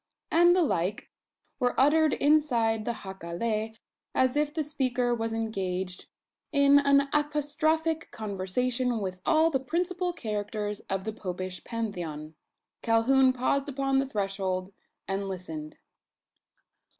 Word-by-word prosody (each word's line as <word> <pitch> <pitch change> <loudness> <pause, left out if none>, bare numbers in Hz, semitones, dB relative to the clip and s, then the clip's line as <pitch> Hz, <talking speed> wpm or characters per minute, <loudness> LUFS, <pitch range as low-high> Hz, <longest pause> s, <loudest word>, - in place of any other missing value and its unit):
and 345 +1 +6
the 365 - +4
like, 195 - -1 0.5
were 245 0 +1
uttered 305 +3 +4
inside 240 -8 +2
the 235 - -1
jacale, 215 +4 -3 0.4
as 260 0 +3
if 295 0 +1
the 315 0 -1
speaker 255 -4 0
was 225 -1 -2
engaged 190 -5 -3 0.4
in 280 -1 +6
an 280 0 +4
apostrophic 305 +2 0
conversation 230 +5 -1
with 185 -2 -4
all 320 +1 +4
the 265 - +1
principal 355 +4 -1
characters 210 - -3
of 195 -1 -1
the 220 +1 -4
Popish 185 -3 -5
Pantheon. 175 -10 -5 0.5
Calhoun 255 +3 +4
paused 270 +3 0
upon 270 0 +1
the 270 - 0
threshold, 195 -4 -2 0.3
and 195 +1 -2
listened. 160 -5 -6
235 Hz, 120 wpm, -28 LUFS, 195-285 Hz, 0.5 s, and